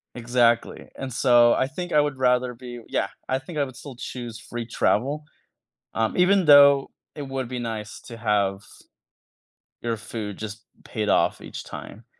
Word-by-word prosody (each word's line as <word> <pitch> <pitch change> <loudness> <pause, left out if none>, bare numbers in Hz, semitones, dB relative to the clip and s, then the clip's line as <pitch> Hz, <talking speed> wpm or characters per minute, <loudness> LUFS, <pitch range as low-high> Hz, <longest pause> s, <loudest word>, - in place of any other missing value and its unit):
Exactly, 120 -1 +1
and 130 -3 -6
so 120 -2 +5
I 130 - +1
think 175 +5 -6
I 150 - +5
would 145 -2 -2
rather 125 -1 +2
be 120 -1 -9
yeah, - - 0 0.2
I 130 - +1
think 150 +3 -6
I - - +3
would 130 -2 -7
still 135 0 -10
choose 120 -3 -7
free 120 +1 -6
travel, 140 +6 0 0.7
um, 110 -1 0
even 185 +1 +4
though 140 -1 +7 0.2
it 150 - -6
would 135 -2 -4
be 125 -1 -4
nice 110 -3 -5
to 115 - -8
have 100 -3 0 1.2
your 115 -1 -2
food 110 -2 -6
just 110 0 -7 0.2
paid - - -3
off - - +2
each - - -8
time. - - -10
125 Hz, 165 wpm, -24 LUFS, 115-135 Hz, 1.2 s, though